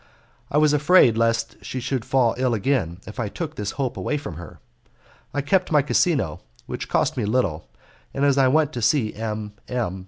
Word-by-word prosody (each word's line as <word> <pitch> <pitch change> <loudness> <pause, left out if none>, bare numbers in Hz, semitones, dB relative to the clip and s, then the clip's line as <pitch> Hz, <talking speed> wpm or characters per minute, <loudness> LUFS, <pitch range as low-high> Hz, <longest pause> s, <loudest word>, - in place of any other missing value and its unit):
I 145 - 0
was 150 -1 +4
afraid 150 -5 +5
lest 115 0 0
she 130 - -4
should 125 0 -2
fall 125 -3 +2
ill 125 -2 +1
again, 105 -7 0
if 105 +4 -9
I 110 -3 -1
took 160 +6 -5
this 105 -6 -4
hope 135 -3 -1
away 150 - -1
from 140 - -6
her. 85 -2 -11 0.7
I 145 - -1
kept 180 +7 +1
my 150 -3 +4
casino, 140 - +1 0.3
which - - -6
cost - - +1
me 120 - 0
little, 100 - 0 0.4
and 140 +1 0
as 140 -1 +4
I 135 -1 +4
went 150 +2 +2
to 120 - -4
see 115 -1 +2
M. 105 -1 -5
M. 115 -7 -2
125 Hz, 195 wpm, -23 LUFS, 110-145 Hz, 0.7 s, afraid